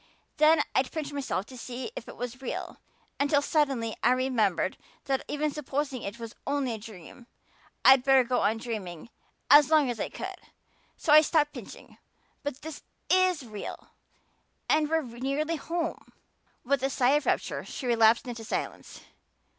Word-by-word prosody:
Then 310 Hz, 0 st, +5 dB
I'd 260 Hz, -, +1 dB
pinch 300 Hz, -3 st, -4 dB
myself 270 Hz, -9 st, -2 dB
to 260 Hz, -, -12 dB
see 250 Hz, -, -6 dB
if -, -, -7 dB
it -, -, -10 dB
was 245 Hz, +1 st, -6 dB
real 265 Hz, -, -5 dB, 0.4 s
until 285 Hz, +1 st, +3 dB
suddenly 270 Hz, -8 st, 0 dB
I 250 Hz, -, +4 dB
remembered 225 Hz, -9 st, +1 dB, 0.3 s
that 270 Hz, -1 st, 0 dB
even 300 Hz, +1 st, -1 dB
supposing 275 Hz, -2 st, -3 dB
it 200 Hz, +3 st, -6 dB
was 230 Hz, -1 st, -8 dB
only 275 Hz, -3 st, 0 dB
a 220 Hz, -, -5 dB
dream 210 Hz, +2 st, -12 dB, 0.6 s
I'd 265 Hz, -1 st, +8 dB
better 270 Hz, -1 st, +5 dB
go 250 Hz, +1 st, 0 dB
on 220 Hz, -, +2 dB
dreaming 215 Hz, -5 st, -6 dB, 0.4 s
as 290 Hz, -1 st, +8 dB
long 305 Hz, -5 st, +4 dB
as 235 Hz, -, -6 dB
I -, -, -2 dB
could; -, -, -6 dB, 0.6 s
so 300 Hz, -, +2 dB
I 305 Hz, -, +10 dB
stopped 300 Hz, -1 st, +1 dB
pinching. -, -, -11 dB, 0.4 s
But 285 Hz, 0 st, -6 dB
it 315 Hz, -2 st, -7 dB, 0.3 s
is 370 Hz, -5 st, +3 dB
real 215 Hz, -3 st, -8 dB, 0.8 s
and 305 Hz, -1 st, +2 dB
we're 320 Hz, 0 st, +1 dB
nearly 275 Hz, +7 st, -2 dB
home." 335 Hz, +3 st, -4 dB, 0.5 s
With 275 Hz, +1 st, +1 dB
a 270 Hz, -, +1 dB
sigh 260 Hz, -1 st, +2 dB
of 295 Hz, +1 st, +1 dB
rapture -, -, 0 dB
she 265 Hz, -, -7 dB
relapsed 230 Hz, 0 st, +4 dB
into 230 Hz, -2 st, -6 dB
silence. -, -, -5 dB
265 Hz, 160 wpm, -28 LUFS, 235-295 Hz, 0.8 s, I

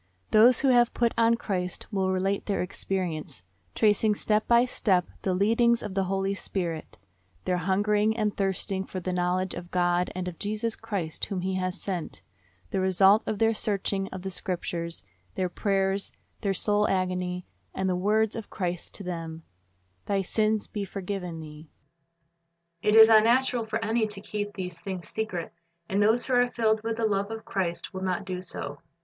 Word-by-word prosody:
Tho.se 230 Hz, +4 st, +6 dB
who 260 Hz, -, +6 dB
have 240 Hz, -1 st, +4 dB
put 235 Hz, -1 st, +2 dB
on 230 Hz, 0 st, +4 dB
Christ 185 Hz, -5 st, -3 dB
will 190 Hz, -1 st, +1 dB
relate 195 Hz, +1 st, 0 dB
their 200 Hz, -, 0 dB
experience, 175 Hz, -, -3 dB, 0.3 s
tracing 210 Hz, 0 st, +3 dB
step 215 Hz, +1 st, +1 dB
by 235 Hz, +1 st, +5 dB
step 190 Hz, -7 st, +1 dB, 0.2 s
the 185 Hz, -2 st, 0 dB
leadings 230 Hz, +4 st, +3 dB
of 210 Hz, -, -5 dB
the 195 Hz, 0 st, +1 dB
Holy 195 Hz, +1 st, 0 dB
Spirit, 175 Hz, -5 st, -3 dB, 0.2 s
— 95 Hz, -2 st, -37 dB
their 180 Hz, -1 st, +1 dB
hungering 205 Hz, +4 st, +1 dB
and 210 Hz, -2 st, 0 dB
thirsting 195 Hz, 0 st, -1 dB
for 190 Hz, -, -6 dB
the 185 Hz, 0 st, -3 dB
knowledge 180 Hz, +1 st, 0 dB
of 175 Hz, 0 st, -7 dB
God 175 Hz, 0 st, +1 dB
and 185 Hz, 0 st, -3 dB
of 175 Hz, -2 st, -6 dB
Jesus 215 Hz, +2 st, -2 dB
Christ 175 Hz, -7 st, -3 dB
whom 190 Hz, -3 st, -3 dB
He 190 Hz, +1 st, -1 dB
has 185 Hz, 0 st, -2 dB
sent, 180 Hz, -5 st, -4 dB, 0.5 s
the -, -, 0 dB
result 190 Hz, +3 st, +5 dB
of 215 Hz, -, -1 dB
their 225 Hz, +2 st, +3 dB
searching 200 Hz, -2 st, -1 dB
of 185 Hz, -1 st, -8 dB
the 190 Hz, -, -4 dB
Scriptures, 170 Hz, -2 st, -3 dB, 0.3 s
their 185 Hz, -1 st, 0 dB
prayers, 195 Hz, +1 st, 0 dB, 0.3 s
their 200 Hz, -, 0 dB
soul 210 Hz, +2 st, +2 dB
agony, 180 Hz, -1 st, -1 dB, 0.3 s
and 190 Hz, -, -2 dB
the 185 Hz, -, +1 dB
words 210 Hz, +4 st, +2 dB
of 225 Hz, -2 st, -6 dB
Christ 180 Hz, -3 st, -3 dB
to 200 Hz, -, -7 dB
them, 165 Hz, -2 st, -5 dB, 0.6 s
"Thy 195 Hz, -1 st, +1 dB
sins 215 Hz, +2 st, +1 dB
be 205 Hz, -, -4 dB
forgiven 185 Hz, -3 st, -5 dB
thee." 155 Hz, 0 st, -11 dB, 1.1 s
It 210 Hz, -, +3 dB
is 220 Hz, 0 st, +10 dB
unnatural 235 Hz, +2 st, +4 dB
for 220 Hz, -, -1 dB
any 220 Hz, 0 st, +1 dB
to 205 Hz, -2 st, -5 dB
keep 205 Hz, 0 st, -4 dB
these 180 Hz, -2 st, -5 dB
things 185 Hz, -1 st, -5 dB
.secret, 205 Hz, -6 st, -4 dB, 0.3 s
and 195 Hz, +2 st, +1 dB
those 220 Hz, +4 st, +3 dB
who 260 Hz, -, -1 dB
are 245 Hz, 0 st, +4 dB
filled 220 Hz, -2 st, +1 dB
with 225 Hz, 0 st, -2 dB
the 230 Hz, -, +1 dB
love 200 Hz, -1 st, 0 dB
of 225 Hz, 0 st, -6 dB
Christ 185 Hz, -2 st, -3 dB
will 190 Hz, -, -5 dB
not 190 Hz, +1 st, -1 dB
do 185 Hz, -1 st, -4 dB
so. 145 Hz, -5 st, -6 dB
195 Hz, 180 wpm, -27 LUFS, 180-215 Hz, 1.1 s, is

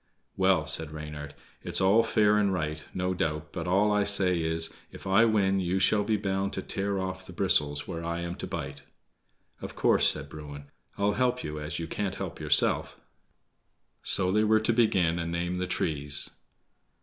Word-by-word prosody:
"Well," 95 Hz, -5 st, +2 dB
said 80 Hz, 0 st, -2 dB
Reynard, 75 Hz, -1 st, -8 dB, 0.3 s
"it's -, -, -1 dB
all 100 Hz, +4 st, +4 dB
fair 105 Hz, -2 st, +2 dB
and 100 Hz, -2 st, +2 dB
right, 75 Hz, -4 st, -3 dB
no 90 Hz, 0 st, -2 dB
doubt, 80 Hz, -3 st, -3 dB
but 85 Hz, -1 st, -5 dB
all 100 Hz, +4 st, +2 dB
I 105 Hz, 0 st, +2 dB
say 95 Hz, -4 st, +4 dB
is, 80 Hz, 0 st, 0 dB, 0.2 s
if -, -, -12 dB
I 95 Hz, +4 st, +4 dB
win, 100 Hz, -3 st, +2 dB
you 90 Hz, 0 st, -1 dB
shall 105 Hz, +2 st, +3 dB
be 110 Hz, +1 st, 0 dB
bound 95 Hz, 0 st, -2 dB
to 95 Hz, -, -4 dB
tear 100 Hz, 0 st, -3 dB
off 95 Hz, 0 st, -5 dB
the 95 Hz, -, -10 dB
bristles 75 Hz, -6 st, +3 dB
where 85 Hz, 0 st, -5 dB
I 85 Hz, +1 st, -3 dB
am 85 Hz, 0 st, -4 dB
to -, -, -6 dB
bite." -, -, -6 dB, 0.8 s
"Of -, -, -8 dB
course," -, -, +3 dB
said 75 Hz, -2 st, -1 dB
Bruin, 70 Hz, -1 st, -10 dB, 0.3 s
"I'll 100 Hz, +1 st, +1 dB
help 125 Hz, +1 st, 0 dB
you, 75 Hz, 0 st, -5 dB
as 75 Hz, +1 st, -5 dB
you 85 Hz, -, -4 dB
can't 95 Hz, +3 st, -3 dB
help 95 Hz, -4 st, -6 dB
yourself." 75 Hz, -1 st, +2 dB, 1.0 s
So 90 Hz, -, +1 dB
they 105 Hz, +2 st, +2 dB
were 110 Hz, 0 st, +4 dB
to 115 Hz, +2 st, +1 dB
begin 95 Hz, -8 st, +2 dB
and 85 Hz, 0 st, -3 dB
name 85 Hz, +1 st, -2 dB
the 90 Hz, -, -2 dB
trees. 75 Hz, -5 st, 0 dB
90 Hz, 185 wpm, -28 LUFS, 80-100 Hz, 1.0 s, all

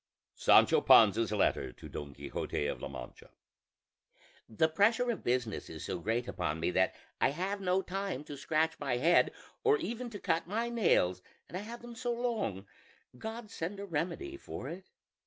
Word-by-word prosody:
SANCHO -, -, +5 dB
PANZA'S 110 Hz, 0 st, +6 dB
LETTER 105 Hz, -2 st, +1 dB
TO -, -, -11 dB
DON 70 Hz, -2 st, -7 dB
QUIXOTE 75 Hz, -, -3 dB
OF -, -, -5 dB
LA -, -, -3 dB
MANCHA -, -, -9 dB, 1.2 s
"The 115 Hz, +8 st, +3 dB
pressure 220 Hz, +9 st, +3 dB
of 225 Hz, -, -5 dB
business 120 Hz, -4 st, -1 dB
is 80 Hz, -, -7 dB
so 95 Hz, -3 st, -3 dB
great 115 Hz, +6 st, -1 dB
upon 80 Hz, -5 st, -2 dB
me 85 Hz, -, 0 dB
that 95 Hz, +1 st, +2 dB, 0.2 s
I -, -, +4 dB
have 190 Hz, +7 st, -2 dB
no 190 Hz, 0 st, +1 dB
time 190 Hz, -6 st, -3 dB
to 150 Hz, -1 st, -8 dB
scratch 155 Hz, +3 st, 0 dB
my 125 Hz, -3 st, 0 dB
head 165 Hz, +7 st, +4 dB, 0.3 s
or 435 Hz, -1 st, +5 dB
even 240 Hz, -, -4 dB
to 205 Hz, -3 st, -7 dB
cut 165 Hz, -1 st, 0 dB
my 225 Hz, +5 st, -1 dB
nails; 95 Hz, -, +2 dB, 0.3 s
and -, -, -9 dB
I 185 Hz, -, -2 dB
have 235 Hz, +3 st, -8 dB
them 240 Hz, 0 st, -8 dB
so 240 Hz, 0 st, -1 dB
long 225 Hz, -, -2 dB, 0.5 s
God 220 Hz, -1 st, -6 dB
send 185 Hz, +5 st, -4 dB
a 200 Hz, -, -4 dB
remedy 185 Hz, -, -3 dB
for 135 Hz, -, -7 dB
it. 185 Hz, +3 st, -9 dB
175 Hz, 175 wpm, -32 LUFS, -, 1.2 s, PANZA'S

